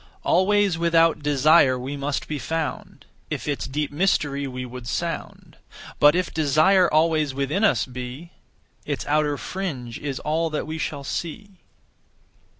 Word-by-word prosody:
Always 195 Hz, -1 st, +2 dB
without 165 Hz, -2 st, +3 dB
desire 145 Hz, -1 st, +4 dB
we 130 Hz, +3 st, -5 dB
must 140 Hz, +1 st, -3 dB
be 150 Hz, -2 st, -3 dB
found, 160 Hz, 0 st, -4 dB, 0.2 s
If -, -, -4 dB
its 145 Hz, -2 st, -2 dB
deep 145 Hz, +2 st, -2 dB
mystery 145 Hz, -4 st, 0 dB
we 125 Hz, -1 st, -5 dB
would 125 Hz, -1 st, -9 dB
sound; -, -, -5 dB, 0.4 s
But 145 Hz, +2 st, +6 dB
if 180 Hz, 0 st, -1 dB
desire 160 Hz, +5 st, +3 dB
always 155 Hz, -3 st, +2 dB
within 140 Hz, +9 st, -1 dB
us 220 Hz, -, +3 dB
be, 125 Hz, +6 st, -8 dB, 0.5 s
Its -, -, -4 dB
outer 150 Hz, -1 st, +1 dB
fringe 135 Hz, -13 st, -5 dB
is 140 Hz, -2 st, -4 dB
all 160 Hz, +2 st, 0 dB
that 155 Hz, -, -3 dB
we 160 Hz, +1 st, -5 dB
shall 145 Hz, -2 st, -4 dB
see. 185 Hz, +6 st, -6 dB
150 Hz, 145 wpm, -23 LUFS, 140-165 Hz, 0.5 s, But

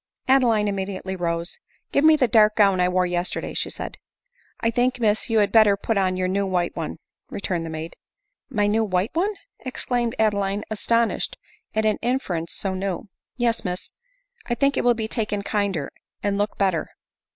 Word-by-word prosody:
Adeline 240 Hz, -6 st, +4 dB
immediately 190 Hz, -1 st, -3 dB
rose. 170 Hz, -, -3 dB, 0.2 s
" -, -, -42 dB
Give 280 Hz, -, +2 dB
me 315 Hz, 0 st, +7 dB
the 270 Hz, -5 st, +3 dB
dark 215 Hz, -1 st, +5 dB
gown 200 Hz, -3 st, +4 dB
I 180 Hz, 0 st, +3 dB
wore 180 Hz, 0 st, +2 dB
yesterday," 175 Hz, 0 st, -2 dB
said -, -, -3 dB
she. -, -, -42 dB, 0.3 s
" -, -, -36 dB
I -, -, +2 dB
think, 250 Hz, +2 st, +1 dB
Miss, 215 Hz, -1 st, +1 dB
you 225 Hz, -, +2 dB
had 205 Hz, -2 st, +3 dB
better 215 Hz, -3 st, +6 dB
put 225 Hz, +2 st, -1 dB
op 190 Hz, -2 st, +2 dB
your 185 Hz, 0 st, 0 dB
new 195 Hz, +1 st, 0 dB
white 180 Hz, -2 st, 0 dB
one," 165 Hz, -2 st, -4 dB, 0.3 s
returned 175 Hz, -4 st, -3 dB
the -, -, -5 dB
maid. 160 Hz, +1 st, -6 dB, 0.3 s
" -, -, -54 dB
My 210 Hz, -6 st, +1 dB
new 215 Hz, +2 st, +2 dB
white 190 Hz, 0 st, 0 dB
one 395 Hz, +5 st, 0 dB, 0.2 s
!" -, -, -56 dB
exclaimed 245 Hz, -2 st, -2 dB
Adeline, 200 Hz, -1 st, +1 dB
astonished 230 Hz, +2 st, +1 dB, 0.4 s
at 220 Hz, 0 st, +1 dB
an 215 Hz, -1 st, +2 dB
interference 195 Hz, -10 st, -1 dB
so 195 Hz, -1 st, -2 dB
new. 190 Hz, +1 st, -3 dB
" -, -, -69 dB
Yes, 235 Hz, -2 st, +1 dB
Miss 180 Hz, -1 st, -3 dB, 0.3 s
— -, -, -31 dB
I 240 Hz, -, +1 dB
think 275 Hz, +4 st, +2 dB
it -, -, 0 dB
will 245 Hz, -1 st, +4 dB
be 220 Hz, -1 st, -3 dB
taken 210 Hz, -3 st, -2 dB
kinder, 200 Hz, -9 st, -1 dB, 0.3 s
and 205 Hz, -1 st, +1 dB
look. 205 Hz, +1 st, -1 dB
better." 190 Hz, -5 st, +1 dB
205 Hz, 200 wpm, -24 LUFS, 185-230 Hz, 0.4 s, me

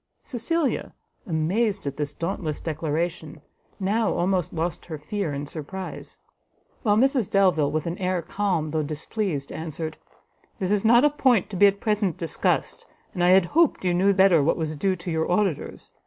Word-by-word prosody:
Cecilia, 280 Hz, +5 st, -1 dB, 0.3 s
amazed 195 Hz, +6 st, 0 dB
at 140 Hz, -1 st, -3 dB
this 145 Hz, 0 st, -2 dB
dauntless 165 Hz, -1 st, -3 dB
declaration, 160 Hz, 0 st, -3 dB, 0.4 s
now 210 Hz, +3 st, +1 dB
almost 180 Hz, -1 st, 0 dB
lost 165 Hz, 0 st, -3 dB
her 160 Hz, -3 st, -5 dB
fear 160 Hz, +3 st, -3 dB
in 140 Hz, 0 st, -4 dB
her -, -, -5 dB
surprise; 165 Hz, +6 st, -6 dB, 0.6 s
while 210 Hz, -3 st, +2 dB
Mrs 260 Hz, -3 st, +2 dB
Delvile, 185 Hz, -7 st, +3 dB
with 155 Hz, +1 st, -2 dB
an 170 Hz, +1 st, -4 dB
air 185 Hz, -2 st, -1 dB
calm 185 Hz, -7 st, -1 dB
though 155 Hz, +1 st, 0 dB
displeased, 155 Hz, +1 st, -3 dB
answered, 160 Hz, 0 st, -5 dB, 0.6 s
"This 190 Hz, 0 st, -2 dB
is 210 Hz, -1 st, +2 dB
not 240 Hz, +4 st, +6 dB
a 295 Hz, -, +4 dB
point 250 Hz, -10 st, +2 dB
to -, -, -5 dB
be 205 Hz, +3 st, +6 dB
at 200 Hz, 0 st, 0 dB
present 210 Hz, -5 st, 0 dB
discussed, 165 Hz, -3 st, -1 dB, 0.3 s
and 175 Hz, -, -1 dB
I 175 Hz, -, +5 dB
had 185 Hz, -1 st, +6 dB
hoped 310 Hz, -, +2 dB
you 180 Hz, -, +2 dB
knew 190 Hz, +3 st, +3 dB
better 190 Hz, -4 st, +5 dB
what 145 Hz, -, +1 dB
was 155 Hz, -2 st, -3 dB
due 190 Hz, +5 st, 0 dB
to 170 Hz, 0 st, -6 dB
your 160 Hz, +1 st, -1 dB
auditors. 185 Hz, -5 st, -1 dB
180 Hz, 175 wpm, -25 LUFS, 155-205 Hz, 0.6 s, not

